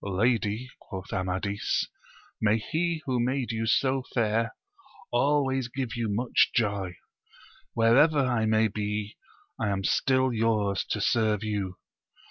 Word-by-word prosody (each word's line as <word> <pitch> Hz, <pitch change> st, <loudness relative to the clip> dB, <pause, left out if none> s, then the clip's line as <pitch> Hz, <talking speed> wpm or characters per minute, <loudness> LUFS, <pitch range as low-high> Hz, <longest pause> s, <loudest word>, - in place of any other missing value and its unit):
Lady, 110 Hz, +3 st, 0 dB
quoth 95 Hz, -3 st, -8 dB
Amadis, 95 Hz, +2 st, -1 dB, 0.6 s
may 110 Hz, 0 st, +3 dB
he 160 Hz, +7 st, -2 dB
who 130 Hz, -2 st, 0 dB
made 125 Hz, +1 st, 0 dB
you 115 Hz, 0 st, -2 dB
so 130 Hz, +3 st, +2 dB
fair, 115 Hz, 0 st, +1 dB, 0.6 s
always 135 Hz, 0 st, +2 dB
give 125 Hz, -1 st, -4 dB
you 115 Hz, -2 st, -1 dB
much 115 Hz, +5 st, +2 dB
joy! 100 Hz, -6 st, 0 dB, 0.8 s
wherever 120 Hz, +7 st, +5 dB
I 120 Hz, -4 st, +1 dB
may 110 Hz, 0 st, +3 dB
be, 105 Hz, 0 st, -3 dB, 0.4 s
I 110 Hz, -, 0 dB
am 95 Hz, -1 st, -1 dB
still 130 Hz, +4 st, +2 dB
yours 110 Hz, -3 st, +1 dB
to 105 Hz, -, -1 dB
serve 110 Hz, -2 st, +2 dB
you. 100 Hz, -4 st, -2 dB
110 Hz, 125 wpm, -27 LUFS, 105-125 Hz, 0.8 s, wherever